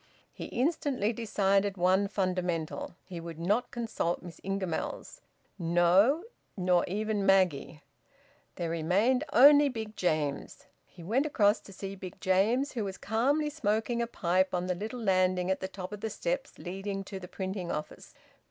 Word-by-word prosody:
He - - -7
instantly 255 -5 0
decided 200 -3 +1
one 185 +3 +3
fundamental: 180 -5 -2
he 180 -3 -7
would 165 -1 -8
not 200 +9 0
consult 225 -8 -2
Miss 175 -2 -10
Ingamells; 195 - -4 0.4
no, 175 - +4 0.3
nor 180 -2 +3
even 210 +2 -1
Maggie! 180 -6 +2 0.7
There 170 -2 -3
remained 195 - +2
only 285 +3 +7
Big 220 -3 -6
James. 155 -5 -2 0.2
He 175 - -14
went 245 - +1
across 210 -7 +3
to - - -14
see 195 +1 -6
Big 185 -2 -9
James, 220 +9 +2
who 230 -4 -3
was 195 -1 -5
calmly 280 +8 +1
smoking 235 -3 0
a 235 - -1
pipe 185 -4 +1
on 180 0 -1
the 180 - 0
little 215 +7 -5
landing 185 -2 +2
at 190 - 0
the 190 - -3
top 190 0 -8
of 210 -1 -7
the 220 - -2
steps - - -3
leading 195 +2 -5
to 195 0 -7
the 180 - -9
printing 190 -1 -4
office. 150 - -6
195 Hz, 155 wpm, -30 LUFS, 180-225 Hz, 0.7 s, only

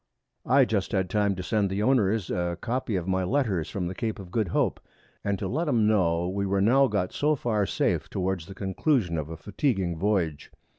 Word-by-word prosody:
I 135 0 +5
just 105 -2 -1
had 95 -2 0
time 105 -2 +2
to 90 - -5
send 100 +3 +1
the 100 +2 -1
Owners 110 -6 +2
a 85 -1 -1
Copy 120 -1 -2
of 90 -1 -2
my 95 0 +1
Letters 100 - 0
from 95 -3 -3
the 90 - -3
Cape 110 +3 -3
of 95 -3 -10
Good 110 -1 0
Hope, - - 0 0.4
and 100 -1 0
to - - -3
let 160 +6 -1
'em 120 -7 +3
know 90 -5 +2
we 100 +2 -2
were 100 0 +1
now 130 +7 +5
got 100 -5 -1
so 150 +1 +2
far 110 -7 0
safe - - 0
towards 95 -3 -2
the 95 - -9
Conclusion 95 - 0
of 75 -1 -3
a 80 - -6
fatiguing 95 - -1
Voyage. 90 -6 0
100 Hz, 210 wpm, -27 LUFS, 90-115 Hz, 0.4 s, I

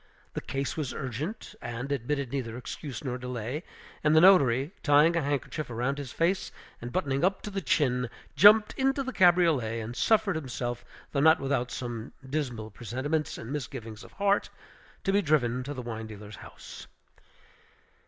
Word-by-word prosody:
The - - -3
case 135 -1 -3
was 150 -5 -3
urgent, 150 - -5
and 125 +4 -5
admitted 140 0 -2
neither 120 -4 -3
excuse 135 +2 -7
nor 125 -2 -3
delay; 125 +3 -4 0.4
and 155 0 +4
the - - +8
notary, 140 -7 +5
tying 150 +3 +5
a 165 - +2
handkerchief 145 +1 -2
round 125 +5 -1
his 135 -3 -6
face, 180 +3 0 0.3
and 120 +1 -6
buttoning 140 -5 0
up 190 +1 +1
to 210 - -5
the 195 0 -2
chin, 125 -8 +1 0.3
jumped 210 +6 +7
into 270 +1 +2
the 260 -1 -5
cabriolet, 165 - +4
and 115 +2 -6
suffered 210 - +2
himself, 120 -4 -4 0.3
though 140 - 0
not 160 +3 +6
without 135 -3 -1
some 120 -2 -5
dismal 125 -7 -3
presentiments 130 +8 -2
and 115 - -7
misgivings 120 -6 -6
of - - -14
heart, 200 0 +1 0.5
to 195 - +1
be 200 - +4
driven 130 -7 +1
to 145 - -5
the 125 - -5
wine 110 -2 -5
dealer's 105 -1 -10
house. - - -11
140 Hz, 165 wpm, -28 LUFS, 120-160 Hz, 0.5 s, the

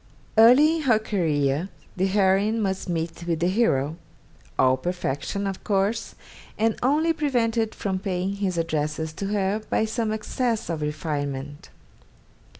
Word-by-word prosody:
Early 260 +9 +7
in - - -3
her 250 -7 +4
career, 160 -6 0 0.3
the 190 +1 +1
heroine 200 +3 +2
must 190 -3 -2
meet 165 0 -3
with 165 -2 0
the 175 +2 +2
hero: 165 - +1 0.6
all 130 0 +4
perfection, 175 +4 -3
of 195 -1 -4
course, 200 +2 0 0.4
and 225 0 +2
only 305 +6 +2
prevented 235 -7 0
from 190 -2 -2
paying 190 0 -2
his 190 -3 -1
addresses 155 -1 -2
to 195 +5 -4
her 205 +1 0
by 220 - +2
some 220 0 -1
excess 220 -1 -2
of 160 -2 -3
refinement. 145 -2 -4
195 Hz, 140 wpm, -25 LUFS, 160-220 Hz, 0.6 s, Early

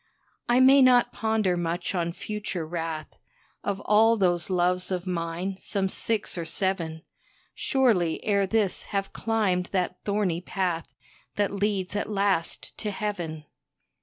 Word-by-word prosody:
I 240 +1 +5
may 270 +2 +7
not 250 -2 +5
ponder 215 -3 0
much 175 +2 -2
on 170 -2 -1
future 200 -2 -4
wrath; 165 -1 -5 0.4
Of 200 -1 -2
all 225 +3 +4
those 175 -3 +1
loves 180 0 +1
of 180 -1 -2
mine, 180 +1 -3
some 195 0 -1
six 210 -3 +1
or - - -2
seven, 165 -2 -1 0.5
Surely 215 -12 +2
ere 200 -2 +2
this 205 -2 +1
have 195 -1 -3
climbed 200 -5 0
that 180 -1 -2
thorny 200 -5 0
path 180 -3 -2 0.5
That 205 -1 +1
leads 200 -1 -1
at 205 - -2
last 195 -5 -1
to 215 - -2
Heaven. 180 -8 -4
190 Hz, 135 wpm, -26 LUFS, 175-210 Hz, 0.5 s, may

